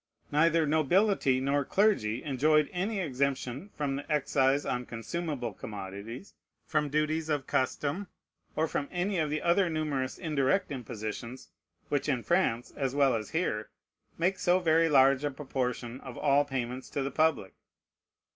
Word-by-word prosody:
Neither 165 Hz, +2 st, +4 dB
nobility 155 Hz, -1 st, +3 dB
nor 140 Hz, +2 st, +1 dB
clergy 135 Hz, -, +1 dB
enjoyed 150 Hz, +2 st, +2 dB
any 195 Hz, +4 st, -1 dB
exemption 140 Hz, +1 st, -2 dB
from 140 Hz, -2 st, -1 dB
the 145 Hz, +3 st, -7 dB
excise 140 Hz, -1 st, +2 dB
on 125 Hz, +1 st, -2 dB
consumable 125 Hz, 0 st, -4 dB
commodities, 105 Hz, -, -8 dB, 0.3 s
from 150 Hz, -2 st, 0 dB
duties 155 Hz, +2 st, 0 dB
of 145 Hz, -3 st, 0 dB
custom, 145 Hz, +9 st, -1 dB, 0.5 s
or 160 Hz, +1 st, +1 dB
from 145 Hz, -2 st, -2 dB
any 180 Hz, +1 st, -1 dB
of 155 Hz, -2 st, 0 dB
the 150 Hz, +1 st, -2 dB
other 175 Hz, +1 st, +3 dB
numerous 150 Hz, -5 st, -2 dB
indirect 155 Hz, +2 st, 0 dB
impositions, 115 Hz, -1 st, -6 dB, 0.4 s
which 145 Hz, +1 st, 0 dB
in 125 Hz, -4 st, 0 dB
France, 170 Hz, -10 st, +1 dB
as 135 Hz, -2 st, -2 dB
well 140 Hz, -3 st, +4 dB
as 110 Hz, -2 st, -3 dB
here, 135 Hz, -11 st, -1 dB, 0.5 s
make 185 Hz, +3 st, +1 dB
so 180 Hz, 0 st, +3 dB
very 165 Hz, -2 st, +3 dB
large 135 Hz, -1 st, +5 dB
a 145 Hz, -, +1 dB
proportion 130 Hz, -3 st, -3 dB
of 130 Hz, -3 st, -9 dB
all 145 Hz, 0 st, +3 dB
payments 130 Hz, -1 st, -4 dB
to 140 Hz, -, -2 dB
the 135 Hz, -, -3 dB
public. 155 Hz, -12 st, +1 dB
145 Hz, 145 wpm, -30 LUFS, 130-160 Hz, 0.5 s, large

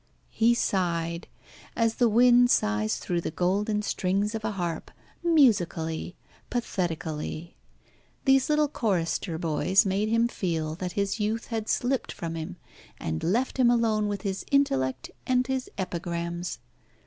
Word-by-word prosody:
He 230 Hz, +1 st, +3 dB
sighed, 170 Hz, -5 st, -1 dB, 0.5 s
as 230 Hz, -1 st, +1 dB
the 240 Hz, -2 st, +4 dB
wind 245 Hz, +2 st, +6 dB
sighs 105 Hz, -, +1 dB
through 175 Hz, -1 st, -2 dB
the -, -, -3 dB
golden 205 Hz, +5 st, 0 dB
strings 200 Hz, +2 st, 0 dB
of 220 Hz, -1 st, -4 dB
a 215 Hz, -1 st, -1 dB
harp, 175 Hz, -4 st, -3 dB, 0.3 s
musically, 190 Hz, -, +2 dB, 0.3 s
pathetically. 170 Hz, -7 st, -3 dB, 0.7 s
These 270 Hz, 0 st, +4 dB
little 300 Hz, 0 st, +3 dB
chorister 180 Hz, -, -1 dB
boys 165 Hz, +4 st, +2 dB
made 200 Hz, +3 st, 0 dB
him 230 Hz, +1 st, +3 dB
feel 165 Hz, -8 st, -2 dB
that 180 Hz, +2 st, -5 dB
his 200 Hz, +2 st, -1 dB
youth 220 Hz, +2 st, -2 dB
had 225 Hz, -2 st, -3 dB
slipped 255 Hz, +1 st, 0 dB
from 165 Hz, -1 st, -5 dB
him, 160 Hz, -1 st, -6 dB, 0.4 s
and 80 Hz, 0 st, -3 dB
left 235 Hz, +11 st, 0 dB
him 245 Hz, -2 st, +5 dB
alone 225 Hz, -3 st, +2 dB
with 205 Hz, -2 st, -3 dB
his 195 Hz, -2 st, -3 dB
intellect 130 Hz, -, +1 dB, 0.2 s
and 255 Hz, 0 st, +2 dB
his 265 Hz, -1 st, -2 dB
epigrams. 170 Hz, -3 st, -3 dB
195 Hz, 135 wpm, -27 LUFS, 170-230 Hz, 0.7 s, wind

